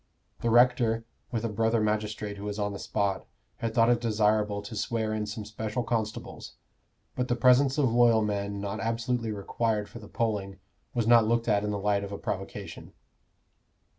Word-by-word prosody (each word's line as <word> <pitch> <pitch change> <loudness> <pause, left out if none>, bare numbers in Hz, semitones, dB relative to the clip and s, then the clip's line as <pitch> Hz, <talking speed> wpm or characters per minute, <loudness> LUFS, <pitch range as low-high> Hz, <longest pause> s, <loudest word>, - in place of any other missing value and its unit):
The 120 - 0
rector, 120 -1 +4 0.3
with 115 -2 -2
a - - +2
brother 115 +2 +1
magistrate 105 -1 -2
who 100 - -7
was 105 0 -3
on 105 -1 -1
the 100 - -6
spot, 100 -2 -1 0.3
had 115 -1 -3
thought 115 0 +5
it 120 -1 +2
desirable 105 -2 +1
to 105 +2 -8
swear 110 +1 -1
in 105 -1 -2
some 105 0 -5
special 110 +3 -3
constables, 110 -2 -4 0.6
but 125 0 -1
the 120 - +1
presence 130 +3 +4
of 130 -6 +2
loyal 120 -2 +5
men 100 -1 -2
not 100 +1 -4
absolutely 115 +2 -1
required 105 +1 -1
for 115 - -10
the 105 - -11
polling 100 -4 -2 0.4
was 120 -2 +1
not 115 -1 +6
looked 115 +1 +1
at 105 -2 +2
in 105 - -1
the 105 - -1
light 100 0 +1
of 100 - -6
a 100 - -4
provocation. 100 -4 -6
110 Hz, 185 wpm, -28 LUFS, 105-115 Hz, 0.6 s, not